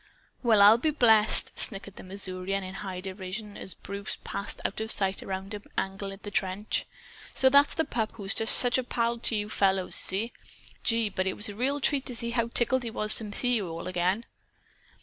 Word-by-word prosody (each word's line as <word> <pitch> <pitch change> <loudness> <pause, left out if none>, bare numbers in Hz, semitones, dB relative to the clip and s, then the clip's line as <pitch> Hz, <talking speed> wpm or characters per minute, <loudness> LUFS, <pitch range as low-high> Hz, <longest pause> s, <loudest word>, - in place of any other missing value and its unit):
"Well, 220 -5 +5
I'll 215 +3 +8
be 310 - +1
blessed!" 225 -7 +5
snickered 200 -2 -1
the - - -10
Missourian 190 0 -2
in 185 0 -7
high 190 -2 -6
derision, 195 +2 -6
as 190 - -6
Bruce 200 +1 -6
passed 200 +1 -4
out 210 - -2
of 220 - -3
sight 195 -3 0
around 190 +2 -5
an 205 - -6 0.2
angle 195 +1 -3
of 195 +1 -11
the 205 - -6
trench. 195 +2 -1 0.5
"So 265 - +5
that's 280 +2 +5
the 320 - +1
pup 225 -2 -2
who 210 - -9
is 195 - +3 0.2
such 250 +1 +4
a - - -1
pal 235 -1 0
of 235 +1 -3
you 210 -2 -1
fellows, 195 -3 +1
is - - +1
he? 210 +6 -2 0.5
Gee, 230 -2 +2
but 190 -1 -2
it 190 - -2
was 210 - -1
a 255 +8 -1
treat 275 0 +1
to 250 - -4
see 235 0 -3
how 235 -1 0
tickled 240 +2 +2
he 235 - -4
was 215 -1 +2
to 220 - -2
meet 205 +3 0
you 210 -10 0
again!" 185 +5 -1
210 Hz, 210 wpm, -28 LUFS, 195-235 Hz, 0.5 s, I'll